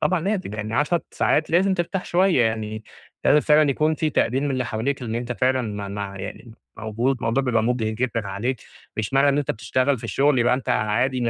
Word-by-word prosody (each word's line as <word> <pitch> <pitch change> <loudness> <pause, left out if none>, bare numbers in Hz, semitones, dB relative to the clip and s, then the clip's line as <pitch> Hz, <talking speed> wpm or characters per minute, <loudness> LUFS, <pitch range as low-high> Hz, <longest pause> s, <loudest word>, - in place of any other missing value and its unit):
طبعًا 185 -2 +1
ناتج 190 - -2
يعني 110 +1 -4
10 150 +6 +1
ساعات 155 - +1
لازم 190 +3 +3
ترتاح 180 +1 -2
شوية 180 -6 +3
يعني، 110 -1 -2 0.4
لازم 150 - +5
فعلًا 150 -1 +4
يكون 155 +3 +1
في 155 0 -1
تقدير 130 -1 +1
من 145 - -1
اللي 130 -1 -1
حواليك، 120 +4 -2
إن 115 -2 -4
أنت 120 +1 -3
فعلًا 130 +1 +1
مع 105 -2 -5
مع 100 0 -5
يعني 115 +4 -8 0.2
موجود 115 +5 -1
الموضوع 120 +3 0
بيبقى 115 -4 +1
مجهد 115 -2 0
جدًا 115 -2 -2
عليك، 120 +7 -2 0.4
مش 110 +3 -3
معنى 135 +1 +4
إن 140 - +2
أنت 145 - -1
بتشتغل 130 +4 0
في - - -11
الشغل 140 -1 +2
يبقى 120 +1 +3
أنت 130 - -5
عادي 120 +5 +1
125 Hz, 205 wpm, -23 LUFS, 110-145 Hz, 0.4 s, لازم